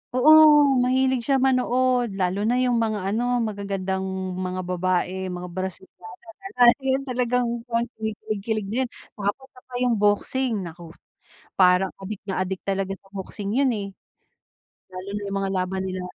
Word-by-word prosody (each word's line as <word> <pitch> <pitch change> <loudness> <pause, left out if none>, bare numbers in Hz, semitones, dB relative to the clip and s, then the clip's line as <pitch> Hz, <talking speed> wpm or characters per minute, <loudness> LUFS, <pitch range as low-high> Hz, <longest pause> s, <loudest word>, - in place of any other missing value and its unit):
Oo, 275 +5 +7 0.5
mahilig 260 0 +2
siya 270 +2 +1
manood, 255 -2 +2
lalo 185 +2 0
na 235 +4 +1
'yung 250 -1 +2
mga 210 -3 -1
ano, 245 +2 +1
magagandang 195 -2 -3 0.4
mga 185 0 -3
babae, 185 +1 -1
mga 180 0 -5
Brazilian 185 -1 -7 0.3
na 390 - -8
lahi, 245 +3 +5 0.2
talagang 250 -1 0 0.2
kon 230 0 +1
kinikilig-kilig 215 -1 -3
na - - -2
'yan. 255 - -2 0.2
Tapos 205 +6 -3
isa 255 - -17
pa 250 - -9
'yung 245 -1 +2
boxing, 210 0 +1
nako. 170 0 -10 0.6
Parang 185 0 +4
adik 200 +1 -6
na 190 -2 -2
adik 185 0 -2
talaga 195 0 -2
sa - - -36
boxing 200 +1 -5
'yun, 270 +2 +3
eh. 205 -4 -2 1.0
Lalo 185 +1 -8
na 205 - -2
'yung 200 0 -4
mga 195 0 -1
laban 185 +1 -1
nila 185 -1 -4
205 Hz, 155 wpm, -24 LUFS, 190-245 Hz, 1.0 s, Oo